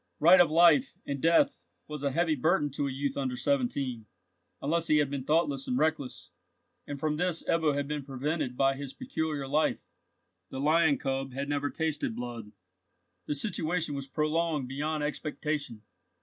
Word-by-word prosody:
Right 175 +4 +8
of 170 - +4
life 175 - +5
and 140 -1 -4
death 165 +1 +3 0.3
was 150 -2 -6
a 140 - +1
heavy 165 +3 +1
burden 150 +1 +1
to 140 +1 -2
a - - -3
youth 140 +2 -2
under 130 -3 -2
seventeen, 130 -3 -1 0.5
unless 165 +4 0
he 155 - +4
had 145 -2 +1
been 135 -2 -4
thoughtless 145 -3 +1
and 125 - 0
reckless, 155 -3 -1 0.6
and 145 -1 -5
from 150 0 -1
this 175 -1 0
Ebbo 160 -3 +1
had 145 0 -1
been 150 -1 -3
prevented 135 -1 -3
by 135 0 +3
his 135 -1 -7
peculiar 160 - -3
life. 150 +3 +1 0.6
The 130 - -6
lion 155 +1 +3
cub 135 -1 -3
had 140 +2 -4
never 145 0 0
tasted 160 -8 -2
blood. 120 -3 -6 0.8
The 150 - -1
situation 165 -2 -1
was 140 -1 -5
prolonged 155 -1 0
beyond 150 +3 -2
expectation. 150 -5 -3
145 Hz, 165 wpm, -29 LUFS, 135-160 Hz, 0.8 s, Right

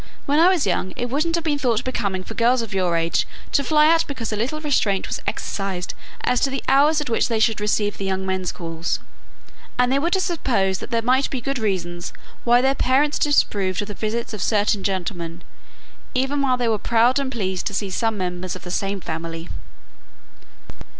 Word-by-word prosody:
When 290 +2 +2
I 345 +3 +7
was 365 - +2
young 185 -1 -1
it 245 0 -3
wouldn't 320 +5 +1
have 335 - -2
been 295 -3 0
thought 240 -5 +1
becoming 200 -7 -2
for 225 - -8
girls 235 +2 +3
of 220 -2 -7
your 180 -3 +1
age 165 0 +1 0.2
to 280 - +2
fly 300 +2 +4
out 330 0 +4
because 235 -6 -4
a - - 0
little 250 +9 -2
restraint 245 -10 +1
was - - -4
exercised 190 -3 -3 0.3
as 250 - +2
to 275 - +2
the 270 0 -3
hours 295 +3 +4
at 295 - -4
which 225 - +2
they 230 -2 0
should 220 -1 +2
receive 210 0 0
the 195 - -3
young 190 0 -1
men's 190 -1 -1
calls. 165 -1 -3 0.8
And 250 0 +3
they 275 - +3
would 340 +6 +1
have 380 - +1
supposed 225 - 0
that - - -7
there 230 -2 0
might 260 +3 +3
be 265 - -3
good 275 +2 -2
reasons 175 -5 -2 0.3
why 240 +1 +5
their 265 +1 +3
parents 275 +3 +2
disapproved 205 - +2
of 205 - -9
the - - -4
visits 225 +3 -3
of 210 - -4
certain 205 -2 +1
gentlemen, 175 -3 -3 0.7
even 270 +3 +1
while 260 -2 +2
they 245 -1 0
were 220 -2 +1
proud 235 +5 +3
and 270 -2 -2
pleased 190 -6 -2
to - - -4
see 200 -1 -2
some 225 +1 0
members 180 -1 -3
of 185 - -10
the 180 - -6
same 195 +1 -2
family." 165 +1 -5
225 Hz, 210 wpm, -22 LUFS, 190-270 Hz, 0.8 s, I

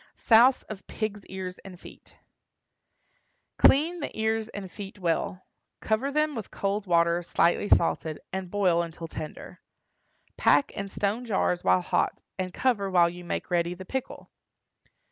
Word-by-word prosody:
SOUSE 240 +3 +5
OF 210 -3 -10
PIGS' 210 -2 -4
EARS 185 -1 -6
AND 185 -3 -12
FEET. - - -15 1.4
Clean 325 +6 +5
the 290 - -3
ears 220 0 0
and 195 -4 -8
feet 205 -1 -9
well; 180 0 -2 0.3
cover 220 +5 0
them 305 +1 +1
with 225 -6 -6
cold 200 +1 -2
water 170 0 +3
slightly 175 +3 +1
salted, 160 -2 +2
and 190 -1 -4
boil 180 -4 +2
until 165 0 -6
tender. 155 -1 -8 0.8
Pack 280 - +3
in 200 - -5
stone 205 +4 -2
jars 190 -5 0
while 185 - +4
hot, - - -1 0.2
and 185 -1 -2
cover 205 -3 0
while 175 -2 +4
you 175 0 -10
make 175 - -4
ready 175 0 +1
the 185 +1 -10
pickle. 265 +5 -5
195 Hz, 145 wpm, -27 LUFS, 175-220 Hz, 1.4 s, SOUSE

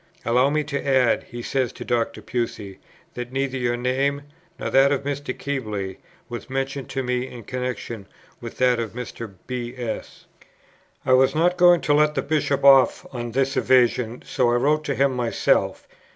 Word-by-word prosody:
Allow 125 +3 +3
me 150 +1 0
to 140 -1 -4
add," 130 -4 +2
he 120 -1 -8
says 130 -2 -1
to - - -8
Dr. 120 -1 -1
Pusey, 110 -5 -4 0.3
"that 125 0 -6
neither 135 0 -2
your 120 -1 0
name, 135 +3 0 0.3
nor - - -4
that 135 +1 +5
of 140 -1 0
Mr. 145 -1 -3
Keble, 105 -9 -3 0.3
was 120 +2 -7
mentioned 135 0 -3
to 135 0 -2
me 125 0 -1
in 120 -3 -10
connexion 120 -4 -5 0.3
with - - -9
that 125 -1 +3
of 115 -2 -4
Mr. 115 -3 -7
B. 125 -1 -5
S." 120 -3 -6 0.8
I 130 - +3
was 130 +3 +4
not 175 +3 +3
going 175 -1 +6
to 145 - +2
let 150 0 +3
the - - 0
Bishop 145 -2 0
off 135 -2 +6
on 120 -2 -5
this 135 +2 +1
evasion, 125 -2 +2
so 125 -2 +1
I 120 - +2
wrote 150 +5 +2
to 140 - -1
him 135 -1 +2
myself. 120 -2 0
130 Hz, 180 wpm, -23 LUFS, 120-140 Hz, 0.8 s, going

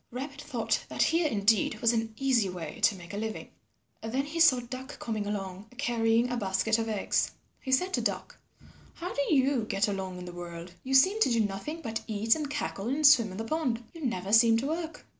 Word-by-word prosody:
Rabbit 275 +4 -6
thought 275 -6 -1
that - - +1
here 330 0 +2
indeed 215 -3 +2
was 230 0 +3
an 225 -1 -2
easy 255 -7 +2
way 170 -4 -7
to 210 - +2
make 175 0 -11
a - - -4
living. 220 +1 -4 0.5
Then 255 +5 -2
he 310 +3 -5
saw 275 -6 +6
Duck 255 +2 -8
coming 215 -3 -3
along 195 0 -5
carrying 235 -2 +1
a 245 - -1
basket 200 +2 +1
of 225 0 -2
eggs. 210 -2 0 0.3
He 265 - -5
said 365 +8 +2
to - - +1
Duck, - - -3 0.6
"How 355 +2 -5
do 285 - -1
you 270 -4 +3
get 205 +1 0
along 190 -2 -4
in 180 - -8
the 175 - -7
world? 175 0 -8
You 265 +1 0
seem 380 +11 +5
to - - +5
do 230 -1 +3
nothing 215 +11 -4
but 225 -2 -3
eat 220 +1 +2
and 300 -3 -3
cackle 260 -8 -3
and 290 +5 0
swim 235 -6 +7
in - - -8
the 225 - -3
pond. 250 -3 -1
You 330 -2 -9
never 200 -6 -2
seem 225 0 +6
to 240 - -2
work." 325 +2 -4
230 Hz, 215 wpm, -29 LUFS, 205-275 Hz, 0.6 s, swim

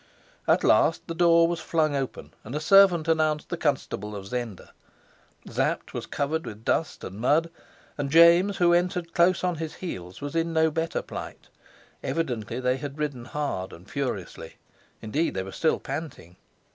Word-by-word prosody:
At - - +3
last - - +4
the 165 - -3
door 170 0 +5
was 170 0 -2
flung 155 -3 0
open, 135 -2 -4
and 120 +6 -7
a - - 0
servant 175 -1 +5
announced 155 -2 +1
the 175 - -2
Constable 130 - -2
of 100 -1 -7
Zenda. 115 -2 -5 0.8
Sapt - - -1
was - - -5
covered 155 +3 -2
with 110 -3 -9
dust 165 - -1
and 95 +3 -7
mud, 160 +6 +2 0.5
and 140 -1 -1
James, 170 +5 +6
who 175 -2 +4
entered 175 -1 0
close 175 +1 +3
on 180 -2 0
his 160 0 -5
heels, 90 - -7
was 145 +2 -6
in 165 0 0
no 160 0 +3
better 165 +1 -2
plight. - - -8 0.5
Evidently 125 -7 -2
they 125 0 +1
had 140 +1 -7
ridden 145 -6 -3
hard 135 -10 -3
and 85 +4 -13
furiously; 125 -10 -5 0.5
indeed 145 +8 -1
they 95 - -1
were 95 - -8
still 160 - +1
panting. 140 - -7
155 Hz, 170 wpm, -26 LUFS, 125-165 Hz, 0.8 s, James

